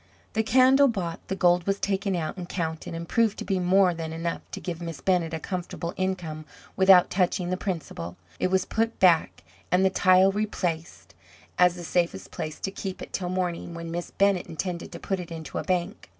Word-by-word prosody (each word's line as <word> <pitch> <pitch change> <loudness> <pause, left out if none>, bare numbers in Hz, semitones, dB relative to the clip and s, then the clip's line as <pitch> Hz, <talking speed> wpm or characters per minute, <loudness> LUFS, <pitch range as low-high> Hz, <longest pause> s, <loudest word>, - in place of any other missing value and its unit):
The 220 - +2
candle 260 +5 +5
bought, 185 -9 -2
the 190 - -2
gold 175 -1 +3
was 195 0 +1
taken 195 0 0
out 160 -3 -3
and 180 -2 -7
counted, 160 -2 -3
and 170 0 -6
proved 225 0 +2
to - - -5
be 195 -2 0
more 185 0 +4
than 165 -1 -5
enough 165 +1 -3
to - - -4
give 175 -2 -5
Miss 165 -3 -5
Bennett 180 -4 +1
a 160 - -3
comfortable 175 0 -4
income 180 -5 -3 0.3
without 190 -2 +6
touching 180 -1 +1
the - - +1
principal. 155 - -5 0.2
It - - +2
was 185 0 +1
put 225 +1 -1
back, 170 - +3 0.3
and 185 +1 +4
the 190 - +3
tile 185 +1 +5
replaced, 180 -5 -3 0.5
as 180 -1 +5
the 175 - -8
safest 160 - -1
place 155 -1 -5
to 195 - -2
keep 190 -1 -5
it - - -11
till 180 -2 -2
morning, 180 -2 -2
when 170 0 -6
Miss 175 +1 -4
Bennett 200 -2 +2
intended 170 +1 -4
to - - -7
put 195 -1 -2
it 175 -1 -7
into 160 -1 -5
a - - -3
bank. 185 +3 -2
180 Hz, 205 wpm, -26 LUFS, 170-190 Hz, 0.5 s, without